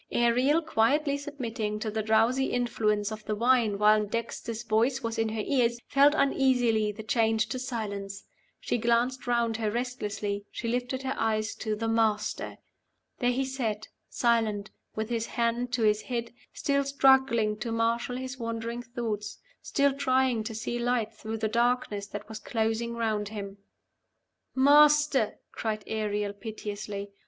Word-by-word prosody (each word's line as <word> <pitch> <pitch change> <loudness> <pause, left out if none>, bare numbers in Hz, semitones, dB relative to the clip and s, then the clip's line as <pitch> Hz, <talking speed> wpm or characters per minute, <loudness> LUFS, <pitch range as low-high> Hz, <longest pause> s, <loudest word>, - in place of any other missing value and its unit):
Ariel, 250 +7 +3
quietly 285 +1 +2
submitting 235 -7 -4
to 215 0 -3
the 220 +1 -1
drowsy 225 +5 +3
influence 215 -4 0
of 215 0 -7
the 215 - -1
wine 230 -2 +3
while 210 +1 +5
Dexter's 230 +1 -4
voice 235 +4 +1
was 230 0 -2
in 225 0 +1
her 215 -1 -3
ears, 240 -4 +1
felt 285 +2 +4
uneasily 250 -6 +2
the 215 +1 -9
change 220 -1 +2
to 255 - -3
silence. 205 -6 -5 0.4
She 240 - -1
glanced 240 +3 +1
round 235 -2 +1
her 220 -2 -1
restlessly; 210 -4 -3
she - - -5
lifted 250 +2 -2
her 265 0 -1
eyes 220 0 0
to 215 -2 -2
"the 225 +2 -3
Master." 220 -2 0 0.6
There 245 - +2
he 260 +2 0
sat, 225 -5 -3 0.2
silent, 220 -4 +1 0.2
with 220 +1 -3
his 230 -1 -1
hand 235 +1 -1
to 240 -3 +1
his 210 0 +3
head, 235 -2 -4 0.2
still 280 -1 0
struggling 265 -6 +3
to 230 - -3
marshal 230 +2 0
his 260 0 -6
wandering 230 +1 -3
thoughts, 230 -3 -4 0.2
still 280 -1 +2
trying 260 -4 +1
to 220 - -5
see 240 +2 -3
light 235 -2 0
through 220 0 -5
the 220 0 0
darkness 235 -3 0
that 205 +1 -7
was 220 0 -7
closing 225 +1 -1
round 215 -3 -1
him. 200 -2 -7 1.0
"Master!" 290 -2 +5 0.2
cried 215 -2 -3
Ariel, 210 -2 -2
piteously. 205 -1 -6
230 Hz, 150 wpm, -28 LUFS, 215-250 Hz, 1.0 s, while